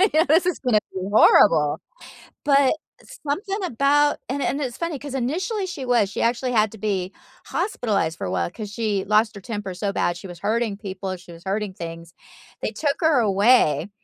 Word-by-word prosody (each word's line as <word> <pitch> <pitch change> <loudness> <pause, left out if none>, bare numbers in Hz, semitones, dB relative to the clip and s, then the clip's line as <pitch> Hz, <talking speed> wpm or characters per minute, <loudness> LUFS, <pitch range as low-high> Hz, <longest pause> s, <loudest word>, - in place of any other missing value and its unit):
you 390 - +5
know, 315 +1 +5
this 330 +4 +4
is 360 - 0
gonna 245 -5 +2
be 190 - -4
horrible." 155 -7 +5 0.6
But, 275 -2 +4 0.5
something 390 +8 -2
about 290 -1 +2
and 275 +3 -3
and 280 - -1
it's 255 -4 -3
funny 335 -4 -3
'cause 285 -1 -7
initially 360 - -1
she 350 -8 -6
was, 235 -5 +2
she - - -3
actually 250 +2 0
had 215 -2 +3
to - - -10
be 195 -3 -2 0.3
hospitalized 210 - -1
for - - -4
a 90 - -3
while 85 -1 -1
'cause 215 -2 -7
she 210 -4 -1
lost 215 +2 +3
her 200 - -9
temper 205 -2 -5
so 195 +2 -3
bad, 175 -2 0
she 185 - -9
was 175 -2 -10
hurting 215 +2 0
people, 195 -1 -6
and 185 -1 -4
she 175 0 -14
was 170 0 -13
hurting 200 0 -2
things. 170 -1 -8 0.5
They - - -2
took 280 +6 -1
her 320 -5 +4
away, 200 - +3
220 Hz, 200 wpm, -23 LUFS, 190-280 Hz, 0.6 s, you